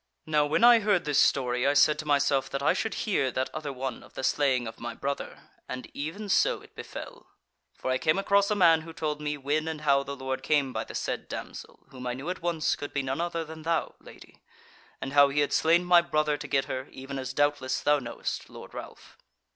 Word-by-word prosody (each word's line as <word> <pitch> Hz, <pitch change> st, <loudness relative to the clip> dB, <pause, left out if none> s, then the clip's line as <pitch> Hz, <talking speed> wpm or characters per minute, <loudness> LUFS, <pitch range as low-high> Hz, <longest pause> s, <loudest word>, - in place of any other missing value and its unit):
"Now 150 Hz, -1 st, +2 dB
when 155 Hz, -, +1 dB
I 240 Hz, -1 st, +8 dB
heard 205 Hz, -5 st, +1 dB
this 150 Hz, -1 st, +2 dB
story 125 Hz, -1 st, +2 dB
I 140 Hz, -, +2 dB
said 150 Hz, +1 st, +5 dB
to 150 Hz, -, -5 dB
myself 140 Hz, -2 st, +2 dB
that 140 Hz, 0 st, -3 dB
I -, -, +4 dB
should 225 Hz, -2 st, -2 dB
hear 190 Hz, -11 st, +1 dB
that 130 Hz, -, -1 dB
other 155 Hz, -2 st, -4 dB
one 130 Hz, -1 st, -5 dB
of -, -, -18 dB
the 130 Hz, -, -5 dB
slaying 130 Hz, -3 st, +2 dB
of 110 Hz, -, -8 dB
my 120 Hz, -1 st, -5 dB
brother, 140 Hz, 0 st, -5 dB, 0.2 s
and 130 Hz, 0 st, -5 dB
even 165 Hz, +9 st, -5 dB
so 195 Hz, -, +3 dB
it -, -, -18 dB
befell. -, -, -9 dB, 0.5 s
For 130 Hz, -, -3 dB
I 130 Hz, -, +1 dB
came 155 Hz, +6 st, +2 dB
across 200 Hz, 0 st, +3 dB
a 210 Hz, -, +1 dB
man 165 Hz, -5 st, +5 dB
who 165 Hz, 0 st, -10 dB
told 150 Hz, -2 st, -3 dB
me 150 Hz, 0 st, -2 dB
when 145 Hz, +3 st, -1 dB
and 160 Hz, -1 st, -4 dB
how 140 Hz, -2 st, +3 dB
the 140 Hz, 0 st, -6 dB
Lord 130 Hz, 0 st, -4 dB
came 140 Hz, -3 st, +1 dB
by -, -, -3 dB
the -, -, -9 dB
said -, -, -3 dB
damsel -, -, -8 dB
(whom 125 Hz, -1 st, -7 dB
I 125 Hz, -, -2 dB
knew 140 Hz, +7 st, -4 dB
at 185 Hz, -, -7 dB
once 170 Hz, -2 st, 0 dB
could 145 Hz, -, -7 dB
be 140 Hz, -, 0 dB
none 135 Hz, +4 st, -2 dB
other 170 Hz, -1 st, -2 dB
than 160 Hz, 0 st, -9 dB
thou, 165 Hz, 0 st, -1 dB
Lady,) -, -, -16 dB, 0.6 s
and 135 Hz, -, -5 dB
how 145 Hz, -1 st, +7 dB
he 145 Hz, +2 st, +1 dB
had 145 Hz, -1 st, 0 dB
slain 170 Hz, +2 st, +3 dB
my 175 Hz, -1 st, +6 dB
brother 155 Hz, -3 st, 0 dB
to -, -, -7 dB
get 135 Hz, -1 st, +1 dB
her, 130 Hz, +1 st, -4 dB
even 135 Hz, +1 st, -7 dB
as 130 Hz, 0 st, -4 dB
doubtless 145 Hz, -1 st, +1 dB
thou 145 Hz, 0 st, +3 dB
knowest, 120 Hz, -3 st, -5 dB
Lord -, -, -11 dB
Ralph. -, -, -10 dB
145 Hz, 235 wpm, -28 LUFS, 135-160 Hz, 0.6 s, I